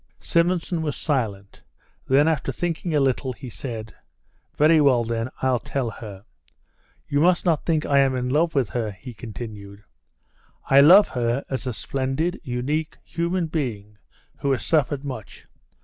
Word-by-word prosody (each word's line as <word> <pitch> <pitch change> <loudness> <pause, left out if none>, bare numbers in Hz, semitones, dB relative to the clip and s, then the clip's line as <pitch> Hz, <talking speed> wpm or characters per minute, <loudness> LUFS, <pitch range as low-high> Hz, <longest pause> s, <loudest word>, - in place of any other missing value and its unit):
Simonson 170 0 +1
was 150 -2 -2
silent; 105 -9 -3 0.5
then, 140 +3 +4
after 155 -4 0
thinking 170 +2 -2
a - - +4
little, 130 -1 0
he 120 +2 -9
said: 110 -4 -6 0.6
"Very 155 +1 +5
well, 130 -5 +4
then, 115 +1 -2
I'll 130 -2 +2
tell 125 0 -3
her. 100 -2 -10 0.8
You 145 - +1
must 175 +4 +3
not 165 -4 +1
think 160 -3 +1
I 140 -1 +3
am 135 -1 +3
in 125 0 -2
love 155 +5 +1
with 130 -6 +1
her," 115 -3 -2
he 110 +6 -10
continued; 105 -2 -9 0.8
"I 135 +1 +7
love 185 +8 +8
her 120 +2 -1
as 130 0 -3
a - - 0
splendid, 135 - -2
unique, 145 +4 -2
human 170 +1 -1
being 110 -10 -4 0.4
who 140 - 0
has 130 - -3
suffered 145 -3 +1
much. 130 -6 -8
135 Hz, 155 wpm, -23 LUFS, 120-155 Hz, 0.8 s, love